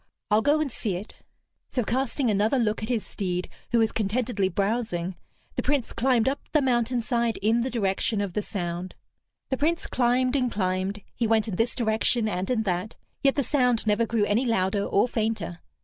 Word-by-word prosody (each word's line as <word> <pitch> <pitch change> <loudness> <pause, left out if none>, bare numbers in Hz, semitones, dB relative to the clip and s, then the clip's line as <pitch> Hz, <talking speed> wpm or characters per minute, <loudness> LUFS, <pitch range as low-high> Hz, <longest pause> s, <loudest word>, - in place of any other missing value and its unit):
"I'll 210 +1 +5
go 295 +5 +3
and 305 -4 -1
see 205 -4 -2
it." 195 +5 -8 0.5
So, 250 - 0
casting 255 +1 0
another 210 +6 +2
look 220 -4 0
at 215 - -4
his 235 -4 0
steed, 180 -3 -3 0.2
who 240 - +3
was 225 -1 +3
contentedly 215 -2 0
browsing, 195 -2 -1 0.4
the - - +2
Prince 280 -4 0
climbed 245 -2 +2
up 275 +2 +1
the 305 - +4
mountainside 235 -2 +1
in 225 +3 +3
the 255 - -1
direction 210 -2 0
of 200 -3 -2
the 210 - 0
sound. 180 -3 -4 0.5
The 265 - 0
Prince 325 +5 +1
climbed 250 +1 +2
and 250 -3 +1
climbed, 190 +1 -1
he 235 - 0
went 220 0 +2
in 205 - -3
this 225 +5 0
direction 225 0 +2
and 185 -2 -2
in 235 -3 +1
that, 185 +1 -2 0.2
yet 275 -1 +3
the 280 - +1
sound 250 -4 +2
never 215 +2 +2
grew 220 -2 +1
any 210 +5 +2
louder 200 -2 +1
or 200 - +2
fainter. 215 -7 -2
225 Hz, 190 wpm, -26 LUFS, 200-245 Hz, 0.5 s, I'll